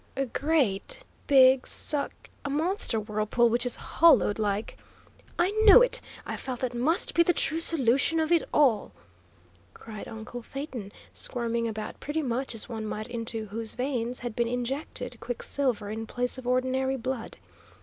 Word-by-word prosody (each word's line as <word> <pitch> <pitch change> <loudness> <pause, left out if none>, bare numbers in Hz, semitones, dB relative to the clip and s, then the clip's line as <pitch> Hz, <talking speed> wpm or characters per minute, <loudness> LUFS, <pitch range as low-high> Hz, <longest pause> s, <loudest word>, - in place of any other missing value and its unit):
"A 275 - 0
great 285 - 0 0.2
big 260 -2 +6
suck, 290 -1 -2
a 285 - -4
monster 310 - +1
whirlpool 215 +2 +1
which 240 +2 +1
is 245 - -1
hollowed 280 -10 +3
like 210 0 -2 0.3
" - - -29 0.2
"I 350 +3 +2
knew 440 +3 +9
it! - - +1 0.2
I - - -4
felt 255 -3 -6
that 255 -1 -2
must 275 +9 +2
be 340 - +4
the 350 +1 +3
true 320 -1 +1
solution 305 0 +3
of 315 +1 0
it 340 -2 +5
all!" 255 -8 +2 0.8
cried 215 -2 -9
uncle 225 +2 -8
Phaeton, 250 -5 -7 0.2
squirming 235 -1 -2
about 215 -1 -6
pretty 305 +2 -3
much 255 -1 -2
as 220 - -3
one 220 -3 -5
might 215 +2 -5
into 230 -2 -3
whose 220 +2 -4
veins 250 -2 -2
had 240 -2 -5
been 235 -1 0
injected 245 0 -4
quicksilver 240 -2 -2
in 220 +1 -5
place 245 +2 -2
of 250 - -9
ordinary 260 +1 0
blood. 255 -1 -5
250 Hz, 160 wpm, -27 LUFS, 225-285 Hz, 0.8 s, knew